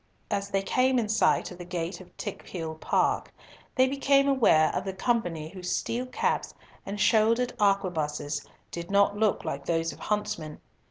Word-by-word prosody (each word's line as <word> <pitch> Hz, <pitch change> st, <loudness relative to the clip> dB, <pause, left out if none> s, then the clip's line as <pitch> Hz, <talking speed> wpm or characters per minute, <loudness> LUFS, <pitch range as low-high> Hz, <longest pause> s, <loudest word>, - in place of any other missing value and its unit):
As 200 Hz, 0 st, -1 dB
they 195 Hz, -1 st, 0 dB
came 255 Hz, +5 st, +2 dB
in 230 Hz, -3 st, +1 dB
sight 215 Hz, -4 st, +2 dB
of 180 Hz, -, -10 dB
the -, -, -6 dB
gate 175 Hz, +1 st, -4 dB
of 185 Hz, -, -17 dB
Tickhill 165 Hz, -3 st, -5 dB
Park, -, -, +1 dB, 0.4 s
they 260 Hz, 0 st, +5 dB
became 275 Hz, +1 st, +3 dB
aware 225 Hz, -, +4 dB
of -, -, -2 dB
a 190 Hz, -, -2 dB
company 185 Hz, -7 st, -1 dB
whose 180 Hz, 0 st, -3 dB
steel 245 Hz, +2 st, -3 dB
caps 250 Hz, -, -1 dB, 0.3 s
and 200 Hz, +1 st, -4 dB
shouldered 230 Hz, +3 st, +3 dB
arquebuses 160 Hz, -8 st, 0 dB, 0.3 s
did 170 Hz, 0 st, -6 dB
not 200 Hz, +1 st, +3 dB
look 215 Hz, 0 st, +1 dB
like 140 Hz, 0 st, -4 dB
those 165 Hz, -2 st, 0 dB
of -, -, -15 dB
huntsmen. 170 Hz, -7 st, -3 dB
195 Hz, 165 wpm, -28 LUFS, 170-230 Hz, 0.4 s, they